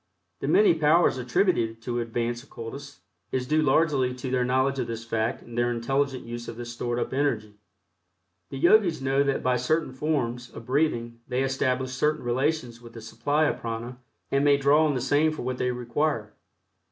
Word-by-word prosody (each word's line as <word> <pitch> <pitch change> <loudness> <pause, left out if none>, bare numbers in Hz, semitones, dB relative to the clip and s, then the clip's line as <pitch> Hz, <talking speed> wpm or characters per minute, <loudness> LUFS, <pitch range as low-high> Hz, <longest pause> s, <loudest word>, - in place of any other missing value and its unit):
The - - -3
many 200 +5 +5
powers 160 -2 +3
attributed 120 - +1
to 120 0 -2
advanced 120 +1 -2
occultists 140 +4 -9 0.3
is 130 -1 -1
due 155 +4 +2
largely 140 -3 +2
to 130 0 -5
their 125 -1 +2
knowledge 130 +2 +1
of - - -1
this 115 0 -5
fact 115 +1 -2
and 120 - -11
their 120 0 +1
intelligent 135 +3 -1
use 120 0 -6
of 115 - -7
this 120 0 -6
stored 120 0 -3
up 120 - -2
energy. 110 -7 -1 0.9
The - - -6
Yogis 185 +3 +4
know 135 +1 +1
that 140 -1 0
by 125 -1 +2
certain 140 +3 0
forms 125 -4 -2
of 115 - -11
breathing 120 -4 0
they 130 +1 0
establish 130 -1 0
certain 150 +4 0
relations 125 -1 -1
with 115 -1 -13
the 115 - -9
supply 145 +8 0
of - - -1
prana 115 +2 -5 0.3
and 140 +1 +2
may 145 -1 +5
draw 145 +3 +4
on 145 - 0
the 125 - -1
same 145 +5 +2
for 155 - -6
what 125 0 -3
they 125 - +1
require. 120 -1 -2
130 Hz, 190 wpm, -26 LUFS, 120-145 Hz, 0.9 s, many